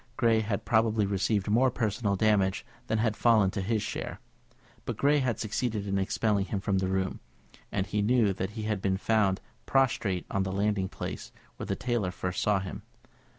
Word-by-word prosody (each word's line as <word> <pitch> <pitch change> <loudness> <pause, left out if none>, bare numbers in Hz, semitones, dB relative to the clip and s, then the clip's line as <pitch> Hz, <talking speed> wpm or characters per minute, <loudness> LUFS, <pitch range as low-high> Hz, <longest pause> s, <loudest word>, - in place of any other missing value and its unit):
Grey 115 -1 +4
had 105 -3 -2
probably 110 -2 +2
received 100 +1 0
more 120 +5 +4
personal 105 -3 -1
damage 100 -2 +2 0.2
than 110 - +1
had 110 -1 +1
fallen 110 -5 +4
to 100 - -3
his 110 +2 0
share; - - -5 0.6
but - - -4
Grey 145 +1 +3
had 130 -4 -1
succeeded 110 -1 -2
in 100 -1 0
expelling 100 0 +1
him 100 - -2
from 95 0 0
the 95 - 0
room, 95 0 -1 0.5
and 95 -1 0
he 105 0 -1
knew 110 -2 +3
that 95 0 -3
he 110 - -3
had 105 -2 -1
been 95 -1 +1
found 100 -2 +1 0.3
prostrate 115 -9 +1
on 100 - +1
the 95 0 -2
landing 100 -1 0
place - - -6 0.3
when - - -6
the - - -1
tailor 120 -6 -1
first 90 0 -3
saw 105 -2 +2
him. 95 -1 -6
105 Hz, 190 wpm, -29 LUFS, 95-110 Hz, 0.6 s, Grey